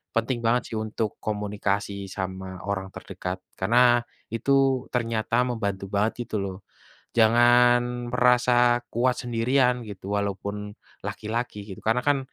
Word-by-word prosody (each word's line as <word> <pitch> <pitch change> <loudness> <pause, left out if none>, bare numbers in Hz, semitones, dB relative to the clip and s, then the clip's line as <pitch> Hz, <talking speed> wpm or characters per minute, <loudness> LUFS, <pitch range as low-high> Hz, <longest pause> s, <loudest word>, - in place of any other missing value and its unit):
penting 120 +1 0
banget 120 +2 +3
sih - - -3
untuk 110 0 -3
komunikasi 100 -1 -2
sama 95 -1 -5
orang 95 -1 -2
terdekat, 95 -1 -6 0.2
karena, 120 +4 +4 0.3
itu, 135 +2 +2
ternyata 115 0 0
membantu 100 -5 -2
banget 110 +4 0
gitu - - -5
loh. 95 -1 -5 0.6
Jangan 120 +1 +4
merasa 125 -1 +4
kuat 125 +2 +2
sendirian, 125 +1 +1
gitu, 100 -1 -6
walaupun 100 +1 -3 0.3
laki-laki 110 -2 -4
gitu, 95 -3 -9
karena 115 +3 +2
kan, 145 -1 +4
115 Hz, 120 wpm, -25 LUFS, 100-120 Hz, 0.6 s, karena